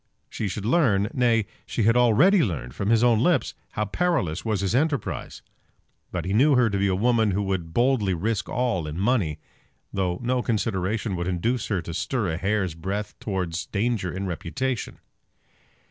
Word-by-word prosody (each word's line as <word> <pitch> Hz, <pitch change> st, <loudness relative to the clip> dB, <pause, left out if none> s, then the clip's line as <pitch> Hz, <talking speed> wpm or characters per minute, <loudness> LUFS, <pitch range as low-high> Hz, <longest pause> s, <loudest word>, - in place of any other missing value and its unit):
She 105 Hz, -, -3 dB
should 100 Hz, +1 st, -4 dB
learn, 110 Hz, -, +3 dB
nay, 115 Hz, -4 st, +2 dB, 0.2 s
she 115 Hz, -, -1 dB
had 115 Hz, +3 st, +4 dB
already 125 Hz, -, +5 dB
learned 65 Hz, -, -3 dB
from 100 Hz, +7 st, -2 dB
his 115 Hz, 0 st, +4 dB
own 120 Hz, -3 st, +4 dB
lips, 165 Hz, 0 st, +2 dB, 0.2 s
how 105 Hz, -, -1 dB
perilous 125 Hz, -, 0 dB
was 110 Hz, -3 st, -1 dB
his 100 Hz, +1 st, 0 dB
enterprise. 145 Hz, -1 st, -1 dB, 0.7 s
But 85 Hz, -3 st, -3 dB
he 95 Hz, -, -1 dB
knew 135 Hz, +6 st, +5 dB
her 125 Hz, -3 st, +3 dB
to 100 Hz, -, 0 dB
be 100 Hz, -, +2 dB
a 95 Hz, -, +1 dB
woman 115 Hz, +1 st, +2 dB
who 100 Hz, +1 st, 0 dB
would 95 Hz, -4 st, -2 dB
boldly 120 Hz, -3 st, +2 dB
risk 105 Hz, +5 st, -2 dB
all 120 Hz, -10 st, -1 dB
in 75 Hz, +2 st, -5 dB
money, 100 Hz, -, +1 dB, 0.6 s
though 90 Hz, -2 st, -1 dB
no 125 Hz, +1 st, +1 dB
consideration 105 Hz, -2 st, -1 dB
would 85 Hz, 0 st, -2 dB
induce 105 Hz, +7 st, -1 dB
her 100 Hz, -5 st, -1 dB
to 85 Hz, -, -6 dB
stir 110 Hz, +2 st, -1 dB
a 80 Hz, -, -2 dB
hair's 95 Hz, -2 st, 0 dB
breadth 100 Hz, +6 st, -4 dB
towards 90 Hz, -5 st, -3 dB
danger 105 Hz, -3 st, -1 dB
in 95 Hz, +3 st, -4 dB
reputation. 110 Hz, +8 st, -3 dB
105 Hz, 175 wpm, -25 LUFS, 95-120 Hz, 0.7 s, already